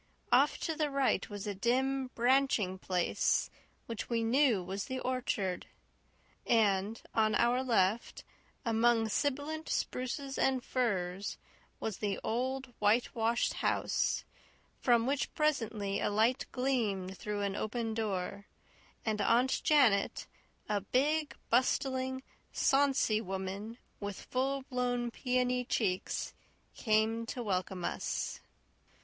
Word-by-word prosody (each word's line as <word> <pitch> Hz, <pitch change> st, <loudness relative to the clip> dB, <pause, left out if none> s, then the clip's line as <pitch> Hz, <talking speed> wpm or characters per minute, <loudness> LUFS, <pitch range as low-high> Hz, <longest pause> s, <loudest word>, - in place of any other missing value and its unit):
Off -, -, +5 dB
to 325 Hz, -, -2 dB
the 305 Hz, -1 st, 0 dB
right 275 Hz, -1 st, +1 dB
was 205 Hz, -2 st, -6 dB
a 205 Hz, -, -2 dB
dim, 260 Hz, +6 st, +1 dB
branching 240 Hz, -6 st, +2 dB
place 180 Hz, -2 st, +1 dB, 0.3 s
which 230 Hz, -2 st, -5 dB
we 230 Hz, -1 st, +1 dB
knew 235 Hz, -4 st, +3 dB
was 190 Hz, +2 st, -4 dB
the 260 Hz, 0 st, -4 dB
orchard; 240 Hz, -8 st, -2 dB, 0.8 s
and 210 Hz, -1 st, +2 dB
on 215 Hz, -1 st, +3 dB
our 240 Hz, +3 st, +3 dB
left, 225 Hz, -3 st, +1 dB, 0.4 s
among 230 Hz, 0 st, +3 dB
sibilant 285 Hz, +7 st, -1 dB
spruces 270 Hz, +2 st, -2 dB
and 260 Hz, -2 st, +2 dB
firs, 200 Hz, -6 st, -1 dB, 0.4 s
was 215 Hz, -3 st, -3 dB
the 205 Hz, -2 st, -2 dB
old, 255 Hz, +2 st, -2 dB
whitewashed 225 Hz, +2 st, +2 dB
house -, -, 0 dB, 0.6 s
from 235 Hz, -2 st, +3 dB
which 275 Hz, +2 st, 0 dB
presently 225 Hz, -10 st, 0 dB
a -, -, +1 dB
light 225 Hz, +5 st, +2 dB
gleamed 215 Hz, -8 st, -1 dB
through 205 Hz, +1 st, -4 dB
an 200 Hz, -1 st, -1 dB
open 225 Hz, +1 st, -2 dB
door, 200 Hz, -2 st, -3 dB, 0.6 s
and 215 Hz, -2 st, 0 dB
Aunt 245 Hz, +5 st, +3 dB
Janet, 250 Hz, -10 st, +3 dB, 0.4 s
a 210 Hz, -1 st, 0 dB
big, 295 Hz, +8 st, +1 dB, 0.2 s
bustling, 260 Hz, +1 st, +1 dB, 0.3 s
sonsy 270 Hz, -6 st, +3 dB
woman, 195 Hz, +3 st, -5 dB, 0.2 s
with 205 Hz, -2 st, -5 dB
full 270 Hz, +1 st, 0 dB
blown 245 Hz, -2 st, -1 dB
peony 250 Hz, 0 st, 0 dB
cheeks, 195 Hz, -6 st, -1 dB, 0.4 s
came 220 Hz, +1 st, +1 dB
to 245 Hz, -, -4 dB
welcome 185 Hz, -3 st, -2 dB
us. -, -, -2 dB
230 Hz, 115 wpm, -32 LUFS, 205-260 Hz, 0.8 s, Off